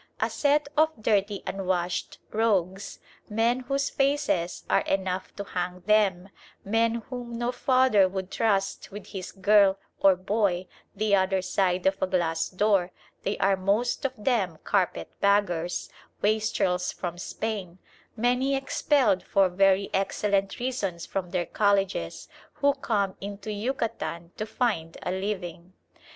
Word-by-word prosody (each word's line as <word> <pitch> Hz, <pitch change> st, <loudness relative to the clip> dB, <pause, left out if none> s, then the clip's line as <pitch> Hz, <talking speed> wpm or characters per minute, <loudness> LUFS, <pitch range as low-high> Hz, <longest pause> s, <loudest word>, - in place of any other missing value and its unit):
A -, -, 0 dB
set 290 Hz, 0 st, +2 dB
of 310 Hz, +1 st, +5 dB
dirty 205 Hz, -2 st, +1 dB
unwashed 180 Hz, -2 st, -2 dB
rogues, 200 Hz, -3 st, 0 dB, 0.3 s
men 230 Hz, +4 st, +2 dB
whose 275 Hz, +2 st, -1 dB
faces 275 Hz, -11 st, 0 dB
are -, -, +3 dB
enough 190 Hz, -1 st, -2 dB
to 200 Hz, -, -4 dB
hang 180 Hz, -1 st, -4 dB
them, 195 Hz, -2 st, +2 dB, 0.4 s
men 225 Hz, +2 st, +1 dB
whom 240 Hz, -2 st, -5 dB
no 240 Hz, +1 st, -1 dB
father 255 Hz, -6 st, +4 dB
would 190 Hz, 0 st, -5 dB
trust 195 Hz, -4 st, 0 dB
with 205 Hz, 0 st, -9 dB
his 190 Hz, -2 st, -6 dB
girl 200 Hz, 0 st, +4 dB, 0.2 s
or 195 Hz, -1 st, +6 dB
boy 185 Hz, -1 st, 0 dB, 0.3 s
the 210 Hz, 0 st, +2 dB
other 190 Hz, 0 st, +2 dB
side 185 Hz, -1 st, 0 dB
of 190 Hz, 0 st, +1 dB
a 190 Hz, -, +2 dB
glass 170 Hz, -3 st, 0 dB
door, 195 Hz, -1 st, +2 dB, 0.3 s
they 200 Hz, -, -2 dB
are 195 Hz, 0 st, +3 dB
most 200 Hz, +8 st, 0 dB
of 270 Hz, -1 st, -1 dB
them 210 Hz, -7 st, 0 dB
"carpet 185 Hz, -, 0 dB
baggers," 180 Hz, -4 st, +1 dB, 0.4 s
wastrels 205 Hz, -4 st, +1 dB
from 175 Hz, -1 st, -5 dB
Spain, 195 Hz, -3 st, -4 dB, 0.4 s
many 250 Hz, +4 st, +2 dB
expelled 265 Hz, -6 st, +2 dB
for 195 Hz, -2 st, +2 dB
very 195 Hz, +2 st, +3 dB
excellent 195 Hz, 0 st, 0 dB
reasons 205 Hz, -9 st, -3 dB
from 185 Hz, -2 st, -3 dB
their 175 Hz, -1 st, -1 dB
colleges, 195 Hz, -, 0 dB, 0.3 s
who 285 Hz, 0 st, +2 dB
come 205 Hz, -8 st, -1 dB
into 200 Hz, +1 st, -6 dB
Yucatan 210 Hz, -6 st, -3 dB
to 215 Hz, -, -4 dB
find 210 Hz, -9 st, -1 dB
a -, -, -2 dB
living. 185 Hz, -2 st, -4 dB
200 Hz, 135 wpm, -27 LUFS, 185-225 Hz, 0.4 s, or